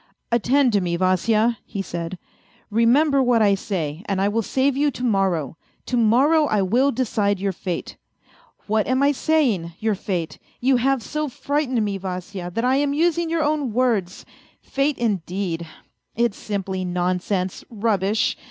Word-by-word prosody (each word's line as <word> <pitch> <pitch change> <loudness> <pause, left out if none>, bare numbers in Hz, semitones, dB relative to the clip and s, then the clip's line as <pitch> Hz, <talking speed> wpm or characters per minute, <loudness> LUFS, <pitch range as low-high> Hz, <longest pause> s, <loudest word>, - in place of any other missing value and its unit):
" - - -52
Attend 255 +1 +2
to 200 - +3
me, 175 -1 -1
Vasya," 215 +6 +2
he 195 - -5
said, 170 0 -5 0.3
" 240 - -33
remember 270 +6 +4
what 245 -2 +3
I 200 -1 +4
say, 170 -6 -3
and 195 -2 -1
I 195 +1 +2
will 225 +2 0
save 265 +5 +1
you 290 +2 +2
to 250 - -7
morrow; 190 - 0 0.3
to 255 - -2
morrow 265 +7 +4
I 210 -5 +1
will 250 +9 +2
decide 210 -5 0
your 195 0 0
fate! 180 -1 -5 0.7
What 215 0 +1
am 260 +2 +2
I 285 - +5
saying, 250 - +1
your 220 0 0
fate? 180 -4 -4 0.2
You 260 +1 +3
have 265 0 +1
so 300 +7 -3
frightened 260 -4 -1
me, 200 -1 -3
Vasya, 185 -1 -5
that 230 - 0
I 260 +2 +3
am 285 0 +1
using 335 +1 +1
your 330 -1 +1
own 295 -5 0
words. 220 -7 0 0.3
Fate, 275 +1 -1
indeed! 185 -5 -2 0.5
It's 235 -3 +1
simply 195 -2 -3
nonsense, 180 +1 -1
rubbish 210 -2 0
220 Hz, 165 wpm, -22 LUFS, 190-260 Hz, 0.7 s, I